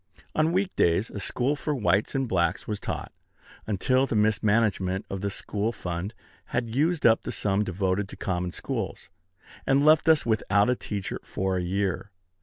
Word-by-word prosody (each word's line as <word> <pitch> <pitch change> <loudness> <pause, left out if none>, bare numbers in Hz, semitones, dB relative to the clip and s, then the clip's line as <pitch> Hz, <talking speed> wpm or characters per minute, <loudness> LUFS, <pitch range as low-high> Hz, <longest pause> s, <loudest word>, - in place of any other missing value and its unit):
On 155 +1 +2
week 190 +2 0
days 85 +6 +2
a 105 - -5
school 130 +7 0
for 150 +1 -2
whites 100 0 +1
and 135 -1 0
blacks 85 -6 0
was 105 -2 -2
taught, - - -5 0.6
until 130 +6 +2
the 115 - -2
mismanagement 105 -3 +2
of 95 -1 -4
the 100 - -1
school 105 +2 -2
fund 90 0 -5 0.3
had 115 -2 -2
used 155 +5 +1
up 115 -1 +6
the - - -5
sum 100 0 +1
devoted 95 +1 -1
to - - -10
common 90 -1 -2
schools, - - -5 0.6
and 140 +2 +4
left 155 +1 +5
us 160 -2 +5
without 105 -1 +2
a - - +2
teacher 100 -5 -4
for 95 -1 -2
a - - 0
year. 95 +2 -1
105 Hz, 175 wpm, -26 LUFS, 95-125 Hz, 0.6 s, up